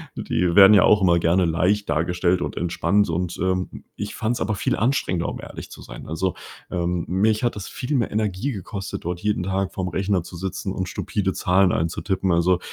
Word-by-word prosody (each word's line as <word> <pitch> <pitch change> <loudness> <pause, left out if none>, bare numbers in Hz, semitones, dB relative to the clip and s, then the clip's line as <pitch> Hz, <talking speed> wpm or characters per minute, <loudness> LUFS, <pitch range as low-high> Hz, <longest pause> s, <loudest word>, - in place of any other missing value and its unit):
die 85 0 -1
werden 100 +1 +9
ja 100 - +7
auch 105 -1 +5
immer 85 -2 +4
gerne 85 +2 +2
leicht 90 +5 +1
dargestellt 90 +3 +1
und - - -4
entspannt 90 +3 +1
und, 85 +1 -2
ähm, 95 0 -2
ich 105 0 -5
fand's 120 +1 -2
aber 105 +1 0
viel - - 0
anstrengender, 105 -8 0
um - - -6
ehrlich - - -9
zu - - -11
sein. - - -10
Also, 90 +3 -1 0.4
ähm, 85 -1 -1
mich 105 +5 +1
hat 120 - 0
das 100 - -6
viel 140 +4 -3
mehr 120 -5 0
Energie 105 +4 -1
gekostet, 100 -3 -6
dort 85 0 -3
jeden 105 -2 -1
Tag 95 +1 -1
vor'm 90 -1 -3
Rechner 95 -2 0
zu 90 - -11
sitzen 95 +1 -4
und 95 -2 -3
stupide 100 -1 -2
Zahlen 95 0 +3
einzutippen. 95 +3 -1
Also, 85 +1 +3
95 Hz, 200 wpm, -23 LUFS, 90-105 Hz, 0.4 s, werden